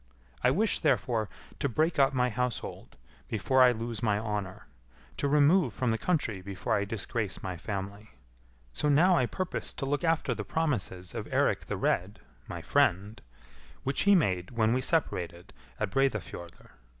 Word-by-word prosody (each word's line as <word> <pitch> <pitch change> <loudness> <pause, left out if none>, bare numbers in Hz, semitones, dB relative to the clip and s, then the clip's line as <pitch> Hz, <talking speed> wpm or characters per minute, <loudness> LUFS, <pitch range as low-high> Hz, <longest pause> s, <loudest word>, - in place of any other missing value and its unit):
I - - +5
wish, 205 +11 +1
therefore, 120 - +1 0.3
to 140 - 0
break 155 +6 +1
up 135 0 +5
my 125 -2 +1
household 125 +1 -4 0.3
before 130 +5 +2
I 125 -1 +8
lose 115 -2 -4
my 105 -3 +2
honour; 105 -3 -4 0.5
to 145 - 0
remove 150 - +4
from 125 -3 0
the 115 - 0
country 130 - -1
before 95 0 -3
I 100 - 0
disgrace 105 0 -3
my 95 -1 -3
family. 100 +3 -6 0.6
So 150 - 0
now 175 +6 +5
I 125 -7 +2
purpose 185 +6 -3
to 135 - -3
look 145 +4 -1
after 165 -6 +1
the 105 -2 -4
promises 100 - -2
of - - -5
Eirik - - +1
the - - -3
Red, - - 0 0.3
my 85 -1 -6
friend, 105 -4 +1 0.6
which 135 +1 0
he 200 0 +6
made 90 - +1
when 115 -2 +1
we 130 - +1
separated 95 - -1 0.3
at 105 -2 -1
Breidafjordr. 110 -10 -2
115 Hz, 160 wpm, -29 LUFS, 100-145 Hz, 0.6 s, I